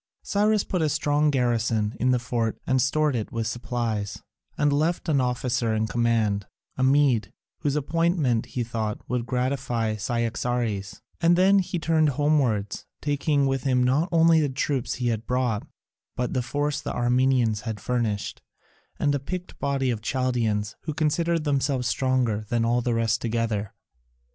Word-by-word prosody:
Cyrus 210 0 +2
put 180 - -2
a 155 - +2
strong 150 0 +2
garrison 115 -5 +1
in 125 - +2
the 125 - +4
fort 120 -2 -2
and 130 -1 +2
stored 150 +2 +1
it 110 -3 -3
with 115 -1 -2
supplies, 115 -3 -3 0.3
and 145 -1 +2
left 160 +5 0
an 145 -4 +3
officer 125 -2 0
in 110 0 +1
command, 110 -4 0 0.3
a - - -4
Mede, 130 -5 +3 0.3
whose 145 -3 -1
appointment, 150 -5 +1
he 125 - -3
thought, 110 -2 -4
would 125 -1 -2
gratify 125 -4 -1
Cyaxares, 115 -2 -2 0.2
and 170 0 +5
then 195 +2 +5
he 180 -1 -2
turned 160 -2 +2
homewards, 135 -8 0
taking 145 0 +1
with 135 -1 0
him 125 -1 +2
not 140 +8 +2
only 165 -1 +5
the 145 - +1
troops 135 -1 -1
he 125 -1 -1
had 115 0 -3
brought, 125 -4 0 0.5
but 125 -1 -2
the 130 - +1
force 145 +4 -2
the - - -4
Armenians 120 -3 +2
had 110 -1 -5
furnished, 115 -3 -2 0.6
and 145 - +1
a 140 - 0
picked 180 +6 -6
body 135 -2 0
of 110 -3 -3
Chaldaeans 115 -4 -1
who 155 -2 -3
considered 165 +1 +1
themselves 140 -3 0
stronger 125 -4 +1
than 115 -1 +1
all 120 +1 +2
the 120 -1 0
rest 115 +1 +1
together. 110 -3 -2
125 Hz, 160 wpm, -25 LUFS, 115-145 Hz, 0.6 s, and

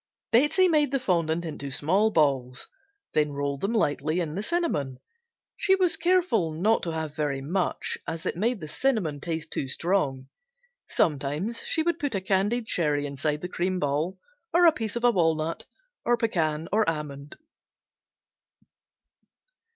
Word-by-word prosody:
Betsey 295 +10 +4
made 305 -4 +3
the 275 - +1
fondant 170 -7 0
into 140 -3 -5
small 185 +11 +2
balls, 135 -8 +1 0.5
then 150 -1 +1
rolled 140 0 -2
them 200 - 0
lightly 155 -5 +1
in 160 -4 -2
the 195 - -3
cinnamon. 210 - -1 0.6
She 385 - +4
was 365 -3 +3
careful 340 - +2
not 210 +8 +2
to 170 - -2
have 160 -2 -4
very 145 -3 -1
much 175 +7 -1
as 165 0 -4
it - - -1
made 220 +3 0
the 155 - -6
cinnamon 195 - 0
taste 160 -1 -4
too 135 - -2
strong. 135 -4 -1 0.6
Sometimes 150 - 0
she 320 - +1
would 340 -1 0
put 285 -6 -2
a 195 - -1
candied 200 +5 +1
cherry 150 -8 0
inside 145 +2 -2
the 180 - -3
cream 185 +1 -1
ball, 150 +6 -1 0.3
or 345 +1 +5
a 335 - +8
piece 225 -8 -4
of 235 - -3
a 245 - +6
walnut, 165 -4 0 0.4
or 240 0 +2
pecan 165 -8 0
or 220 +1 +4
almond. 150 -2 -6
170 Hz, 155 wpm, -26 LUFS, 150-225 Hz, 0.6 s, a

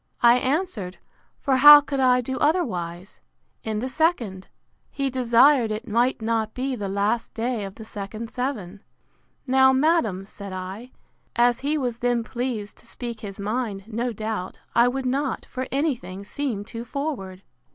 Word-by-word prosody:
I 240 +1 +7
answered—for 265 - -2
how 295 +2 +11
could 285 -1 -4
I 250 -1 +4
do 260 +2 -4
otherwise?—In 210 - -3
the 255 - -2
second. 255 - 0 0.4
He 275 -1 -2
desired 250 0 +4
it 215 +4 -4
might 235 +1 +1
not 220 -1 -1
be 260 +1 -2
the 205 -4 -4
last 205 +4 -1
day 230 -1 -2
of 195 0 -9
the 220 - -10
second 215 +2 -7
seven. 215 -7 -4 0.6
Now, 265 0 +5
madam, 260 - +2
said 200 -1 -9
I, 190 +6 -6 0.5
as 240 0 +3
he 295 +3 0
was 245 -4 -2
then 245 -1 +1
pleased 235 -4 -4
to - - -18
speak 235 -1 -6
his 200 -3 -8
mind, 210 -1 -2
no 235 +2 -2
doubt, 215 -4 -4 0.2
I 235 +1 +5
would 265 +1 -2
not, 270 +2 -1
for 260 0 -5
any 285 +2 +1
thing, 190 -3 -9
seem 220 -2 -3
too 230 +1 -7
forward. 240 -9 -5
235 Hz, 155 wpm, -24 LUFS, 210-265 Hz, 0.6 s, how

